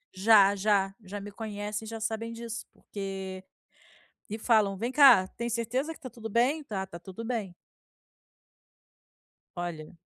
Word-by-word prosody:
Já, 200 0 +6
já, 195 -1 +2
já 200 +2 -6
me 205 +1 -8
conhecem 210 0 -5
e - - -7
já 225 0 -6
sabem 225 +1 -3
disso, 230 0 -6
porque 190 -2 -6 0.9
e 215 - -3
falam: 215 -4 +3
"Vem 235 +6 -2
cá, 260 -10 +8
tem 235 +4 -5
certeza 245 +7 -1
que - - -14
tá 265 - -7
tudo 225 -2 -8
bem?". 260 +8 +2
"Tá, 195 -7 -4
tá 170 - -10
tudo 190 +6 -9
bem!". 225 -6 -3 2.0
Olha 170 -1 -5
215 Hz, 150 wpm, -29 LUFS, 195-230 Hz, 2.0 s, cá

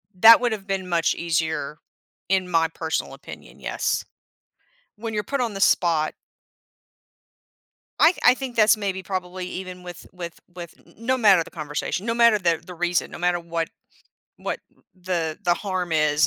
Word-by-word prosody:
that 225 +5 +9
would 245 -1 +1
have 205 -3 -5
been 195 -2 -2
much 165 -2 +2
easier 160 -3 -1 0.5
in 185 -1 +1
my 165 -1 +3
personal 160 0 -3
opinion, - - -12
yes. - - -1 0.9
When 225 +1 -5
you're 210 - 0
put 280 -1 -2
on 235 -4 -1
the 195 - -5
spot 165 -5 +3 1.9
I 345 - +6
I 245 - +8
think 260 -2 -6
that's 215 0 +5
maybe 195 -2 -3
probably 185 -1 -4
even 180 -1 -7
with 175 -1 -9
with 170 -2 -8 0.2
with 175 -2 -9
n - - -21
n 230 - -12
no 260 +1 +2
matter 200 -8 +5
the - - -13
conversation, 155 +5 -4
no 230 - 0
matter 235 -2 +5
the 170 -4 +1
the 180 - -9
reason, 175 0 0
no - - -7
matter 175 0 +1
what 170 -1 -3 0.7
what - - -4 0.3
the 175 -4 -3
the 175 -2 +3
harm 185 -3 -3
is 150 -1 +3
180 Hz, 170 wpm, -24 LUFS, 165-205 Hz, 1.9 s, that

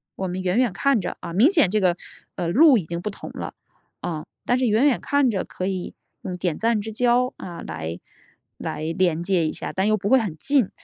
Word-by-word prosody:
我 190 - -3
们 180 +1 -4
远 185 +4 +1
远 250 -4 +3
看 265 +3 +2
着 - - -5
啊， 170 - -6
明 220 - +5
显 310 - +3
这 215 - +2
个， 180 -3 +2 0.4
呃， 175 -2 -2
路 280 - +6
已 185 - -2
经 170 +2 -4
不 210 - -3
同 200 - -9
了， - - -6 0.5
呃， 155 -3 -4 0.2
但 245 +1 +2
是 255 - +2
远 220 +5 +3
远 280 -4 +3
看 285 -3 +2
着 195 - -1
可 185 - -5
以 190 -2 -3 0.3
用 180 - -5
点 175 -3 -1
赞 230 +3 +1
之 220 +2 -5
交， 245 +3 +2
啊， 170 -2 -8
来 80 +1 -5 0.6
来 155 - -4
连 175 -3 +2
接 175 -2 +1
一 - - -1
下， - - -5
但 190 +2 +1
又 215 0 +3
不 200 0 -4
会 265 +5 +6
很 195 -9 -3
近。 275 - +2
195 Hz, 250 characters per minute, -23 LUFS, 175-245 Hz, 0.6 s, 路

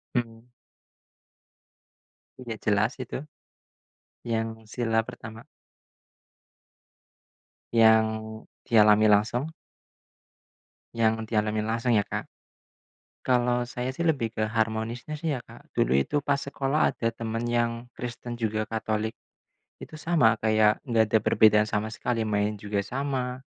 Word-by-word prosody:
Mmm. 115 -2 -2 2.0
Udah 115 -3 -6
jelas 110 +2 +2
itu. 130 -3 -5 1.1
Yang 115 -1 -1 0.2
sila 115 -2 0
pertama. 110 +1 -9 2.3
Yang 110 -1 +6 0.6
dialami 110 -1 +6
langsung. 120 +9 +2 1.4
Yang 110 -1 +1
dialami 105 0 +1
langsung 115 0 +1
ya, 100 - +1
Kak. - - -5 1.0
Kalau 125 -1 +2
saya 125 +1 -3
sih 170 +6 -2
lebih 130 -8 +1
ke 110 -1 -1
harmonisnya 115 +6 -2
sih 155 -3 -1
ya, 125 - -7
Kak. - - -16
Dulu - - +2
itu 145 - -1
pas 140 -1 +1
sekolah 140 +1 0
ada 115 - -1
teman 115 0 -4
yang 120 0 +1 0.2
Kristen 120 0 -6
juga, 110 -1 -1
Katolik, 110 0 -2 0.7
itu - - -12
sama, 120 -11 +3
kayak 110 -1 +3
nggak 115 -2 +4
ada 110 - +6
perbedaan 105 0 +4
sama 110 +1 -2
sekali, 115 -1 -1
main 105 0 0
juga 100 0 -2
sama, 130 +3 -3
115 Hz, 115 wpm, -27 LUFS, 110-125 Hz, 2.3 s, Yang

